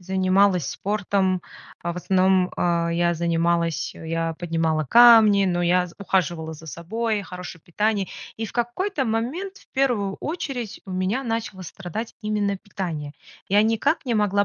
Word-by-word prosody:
занималась 190 -2 +2
спортом, 195 -2 0 0.4
а 170 0 -3
в - - -11
основном, 185 0 +2
а, 170 -1 +1
я 170 0 +1
занималась, 170 0 0
а, - - -13
я 165 0 -2
поднимала 160 -2 -1
камни, 225 - +7
но 175 -2 0
я 180 +1 +3
з 170 - -14
ухаживала 170 -4 0
за 160 +1 -12
собой, 210 - -2
хорошее 180 -3 -9
питание. 205 +2 0 0.3
И 225 - -3
в 220 - -7
какой-то 265 - -1
момент 275 - -2
в - - -23
1 240 -8 +1
очередь 275 - -4
у 190 - -10
меня 185 +8 -1
начало 225 -6 -3
страдать 195 +6 -6
именно 210 -2 -1
питание. 165 -8 -5 0.3
Я 205 +2 +4
никак 225 +8 +1
не 240 - 0
могла 205 -1 +2
190 Hz, 155 wpm, -23 LUFS, 170-220 Hz, 0.4 s, камни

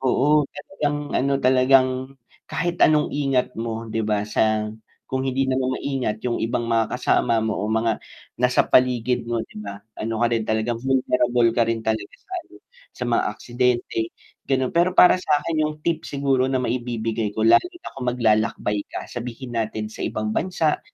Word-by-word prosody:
Oo, 145 +3 +3
talagang 145 -6 -3 0.2
ano 140 +2 +1
talagang, 130 +1 +5 0.6
kahit 175 -1 -2
anong 150 -1 +4
ingat 135 -3 0
mo 115 0 -3
'di 115 - -1
ba, 105 -1 0
sa 110 0 +1 0.4
kung 130 0 -1
hindi 135 +1 +1
naman 130 0 0
maingat 125 -6 -3
yung 120 - -1
ibang 120 +1 -1
mga 115 +1 0
kasama 120 -2 +2
mo 110 - 0
o 105 - -2
mga 110 0 0 0.4
nasa 125 0 +3
paligid 125 -1 +2
mo 120 - 0
'di 105 - -11
ba, 100 -1 -7 0.2
ano 115 +1 -2
ka - - +5
rin 115 -2 +1
talagang 110 +1 0
vulnerable 125 -2 +2
ka 120 - +2
rin 115 -1 0
talaga 110 - -2
sa 445 - -34
ano, - - -20 0.4
sa - - -4
mga - - +2
aksidente 125 -1 -1 0.4
gano'n. 130 -2 0
Pero 175 +2 +4
para 180 - +8
sa'kin 155 -1 +1
yung 150 0 -3
tip 165 -1 0
siguro 135 -2 +1
na 130 - +1
maibibigay 115 -3 -2
ko 110 - -1
lalo - - +7
na 355 0 -9
kung 125 -2 -3
maglalakbay 110 -3 +1
ka - - -6
sabihin 120 +1 -7
natin 110 -1 -2
sa - - -11
ibang 110 0 -2
bansa 165 -4 0
125 Hz, 170 wpm, -23 LUFS, 115-135 Hz, 0.6 s, para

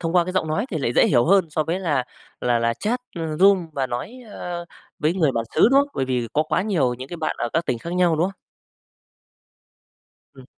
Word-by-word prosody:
thông 165 -1 -2
qua 175 -1 +5
cái 185 - -4
giọng 185 -4 0
nói 200 +10 -1
thì 160 - -2
lại 120 -3 -1
dễ - - +5
hiểu 120 -4 +3
hơn 190 -1 +4
so 155 0 0
với 175 +5 -2
là 145 -8 0 0.4
là 120 -1 +2
là 115 0 +1
chat, 235 - -2 0.2
ờ, 160 -2 -3
room 190 0 +4
và 135 -2 -1
nói, 125 - -5 0.2
ơ, 175 -2 -5 0.3
với 155 +4 +1
người 155 -7 +2
bản 115 -1 -1
xứ, - - +1
đúng 275 - +6
không? 285 - -1
Bởi 135 - 0
vì 125 -3 -1
có 155 - +2
quá 170 +4 0
nhiều 155 -13 +1
những 130 +2 -9
cái 175 - -6
bạn 160 -2 -2
ở 120 - -1
các 165 +1 +1
tỉnh 120 - -1
khác 170 +7 -6
nhau, 180 -3 +2
đúng 165 - +2
không? 195 - -2 2.0
Ừm. 130 -2 -14
160 Hz, 245 wpm, -22 LUFS, 130-180 Hz, 2.0 s, đúng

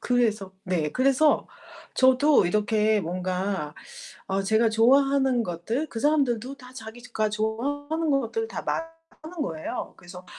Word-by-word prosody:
그래서 215 -6 0
네 170 -5 -1
그래서 275 +4 +3 0.5
저도 260 -2 +4
이렇게 210 +2 +2
뭔가 180 -2 -3 0.5
어 195 +1 -1
제가 220 +4 +3
좋아하는 265 +2 +3
것들, 220 - -3
그 230 - -6
사람들도 275 -3 +1
다 250 -2 -14
자기가 225 -2 -4
좋아하는 285 +9 -2
것들 275 - 0
다 - - -5
말하는 330 0 -6
거예요. 160 - -5
그래서 180 +1 -12
235 Hz, 275 characters per minute, -25 LUFS, 200-280 Hz, 0.5 s, 저도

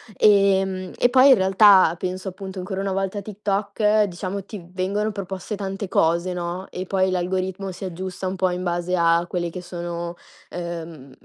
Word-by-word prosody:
Ehm 195 -2 +3
e 245 - +4
poi 260 +2 +6
in - - +9
realtà 190 -2 +6
penso 185 +1 -3
appunto 190 0 -8
ancora 190 +1 -4
una 195 -1 -1
volta 195 +1 -2
a - - -2
TikTok, 210 +1 0
diciamo 190 +1 -4
ti 200 -6 -9
vengono 200 +3 -1
proposte 195 0 -5
tante 195 0 -4
cose, 170 +3 +2
no, 175 +1 -4
e 185 +1 -5
poi 190 0 +1
l'algoritmo 185 +1 -2
si 180 - -10
aggiusta 185 +1 -5
un 190 - -3
po' 185 0 +2
in 180 +1 -3
base 175 +1 -1
a 170 0 +3
quelle 175 -1 -2
che 180 - -7
sono, 175 -1 -5 0.4
uhm 165 -5 -7
185 Hz, 175 wpm, -23 LUFS, 175-195 Hz, 0.4 s, in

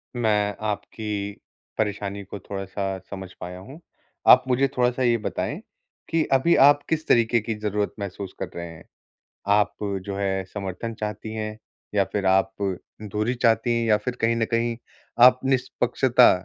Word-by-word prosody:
मैं 105 -3 +1
आपकी 105 -1 -3 0.4
परेशानी 100 -2 -2
को 100 +1 -8
थोड़ा-सा 95 0 -4
समझ 95 -2 -7
पाया 90 +1 -6
हूँ, 135 - -11 0.5
आप 125 - +9
मुझे 130 +2 +3
थोड़ा-सा 125 +1 +2
ये 120 -1 +3
बताएँ 110 - -3 0.5
कि 165 -1 +2
अभी 135 +6 +4
आप 145 0 +6
किस 160 0 -1
तरीके 115 0 +4
की 110 0 -3
ज़रूरत 105 -1 -1
महसूस 100 -1 -6
कर 95 - -4
रहे 85 0 -4
हैं? 85 -1 -12 0.7
आप 105 0 +3 0.3
जो 100 -1 -4
है 95 -1 -1
समर्थन 100 +3 -4
चाहती 105 +1 -4
हैं 110 0 -4 0.4
या 100 -1 +4
फिर 100 -2 -1
आप 95 0 +3 0.5
दूरी 105 +4 -1
चाहती 115 0 +2
हैं 115 - 0
या 105 - +5
फिर 125 +2 -4
कहीं 115 +1 +2
न 115 - +1
कहीं 115 0 0 0.5
आप 125 0 +7
निष्पक्षता 125 -1 +3
105 Hz, 155 wpm, -24 LUFS, 100-120 Hz, 0.7 s, आप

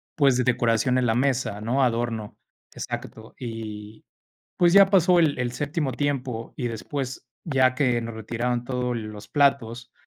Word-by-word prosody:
pues, 135 -4 +3
decoración 120 +1 +2
en 125 - +1
la 115 -1 +2
mesa, 130 -5 0
¿no? 125 +5 +1
Adorno. 115 -3 -2 0.4
Exacto. - - -7
Y, 110 -3 -7 0.5
pues, 175 -1 +4
ya 200 0 +9
pasó 180 -2 +5
el 155 -5 +2
el 120 - -1
séptimo 145 +1 -2
tiempo 130 -4 -3
y 125 -3 -2
después, 130 +3 -5 0.2
ya 130 -5 +2
que 125 -3 +1
nos 115 0 -6
retiraron 120 +2 -2
todos 125 -1 -2
los 110 -2 -7
platos, 125 -4 +1
125 Hz, 150 wpm, -25 LUFS, 115-140 Hz, 0.5 s, ya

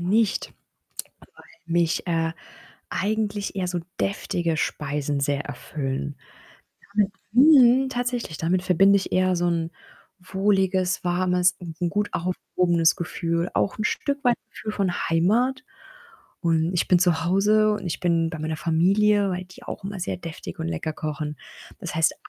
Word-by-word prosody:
nicht, 205 +4 +1 0.9
weil - - -20
mich, 170 0 +1
äh, 165 -1 0 0.6
eigentlich 205 -1 -1
eher 185 -2 -1
so 180 0 -2 0.2
deftige 175 -4 -1
Speisen 145 -1 -2
sehr 140 0 0
erfüllen. 135 - -4 0.8
Damit 205 -1 +2 0.2
mhm, 260 -1 +6
tatsächlich, 245 - -3
damit 180 +3 +1
verbinde 195 +2 +5
ich 195 - -2
eher 185 0 +2
so 175 0 0
'n 165 -1 -1 0.5
wohliges, 190 -1 0
warmes 180 0 +2
und 165 -2 -9
'n 175 -1 0
gut 205 +3 0
aufgehobenes 175 -1 +1
Gefühl, 170 0 -2
auch 200 - +1
'n 215 - -2
Stück 280 +5 -1
weit 245 -1 +4
Gefühl 215 - -6
von 195 -3 0 0.2
Heimat 235 +11 +2 0.8
und 165 0 +1
ich 175 - 0
bin 180 - +5
zu 170 -3 +2
Hause 210 +4 +3
und 210 - -4
ich 170 - -3
bin 165 -2 +1
bei 160 - -6
meiner 155 +1 -3
Familie, 195 +6 +3
weil 180 0 -3
die 185 0 -16
auch - - -7
immer 195 -1 -5
sehr 180 - -2
deftig 165 - -8
und 80 - -3
lecker 85 - -3
kochen. 150 -1 -4 0.4
Das - - -5
heißt, 160 0 +2
180 Hz, 150 wpm, -24 LUFS, 165-205 Hz, 0.9 s, mhm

